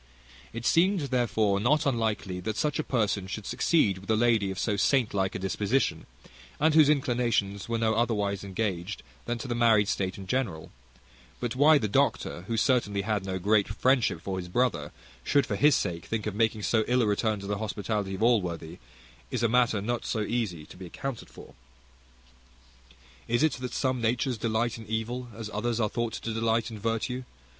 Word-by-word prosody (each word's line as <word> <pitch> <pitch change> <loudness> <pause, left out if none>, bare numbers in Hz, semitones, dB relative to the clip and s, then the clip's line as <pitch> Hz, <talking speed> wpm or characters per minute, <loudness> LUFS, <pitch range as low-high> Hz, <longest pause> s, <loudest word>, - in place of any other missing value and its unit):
It 115 +1 -6
seemed, 185 +4 +3
therefore, 110 -5 +1
not 145 +8 +2
unlikely 110 -7 -1
that 110 +4 -4
such 150 -1 0
a - - +1
person 105 -7 0
should 105 +2 -6
succeed 105 - +2
with 95 - -14
a 110 - +4
lady 110 -3 +2
of 95 - -5
so 105 +2 0
saint 120 +4 +2
like 95 -1 0
a - - 0
disposition, 100 +7 -1 0.5
and 155 +1 +3
whose 155 -2 +6
inclinations 120 -8 0
were 115 - 0
no 110 -1 +1
otherwise 105 -4 0
engaged 95 -1 -3 0.2
than 120 0 -2
to 115 - -6
the 120 - -1
marriage 115 -4 +4
state 95 -1 -1
in 95 - -8
general; 100 -9 -2 0.7
but 120 -1 -3
why 150 +3 +6
the 110 - -1
doctor, 90 -2 0
who 115 - -1
certainly 105 -5 +1
had 105 -2 -1
no 95 -1 -2
great 100 +2 +2
friendship 125 -3 +1
for 95 0 -3
his 90 - -6
brother, 125 +7 0 0.3
should 140 - +2
for - - -2
his 150 -1 +5
sake 85 -1 -2
think 110 -2 -2
of 105 - -2
making 110 0 0
so 110 +1 +2
ill 125 0 +3
a - - +2
return 105 0 0
to 100 - -8
the 100 0 -2
hospitality 105 -2 -2
of 105 - -3
Allworthy, 90 -8 0 0.5
is 125 -3 -2
a - - +5
matter 120 -3 +2
not 120 +2 -2
so 110 - -2
easy 105 -8 -2
to - - -14
be 90 -1 -8
accounted 135 +6 -6
for. - - -13 1.7
Is 120 +5 +1
it 155 - +3
that 125 0 -5
some 130 -2 0
natures 120 +1 0
delight 115 +1 -1
in 110 - -11
evil, 115 +3 -3
as 110 -2 -6
others 115 +2 -1
are 110 -2 +1
thought 120 -1 -2
to 115 - -4
delight 115 0 0
in 110 - -7
virtue? 115 +4 -2
110 Hz, 195 wpm, -28 LUFS, 100-120 Hz, 1.7 s, whose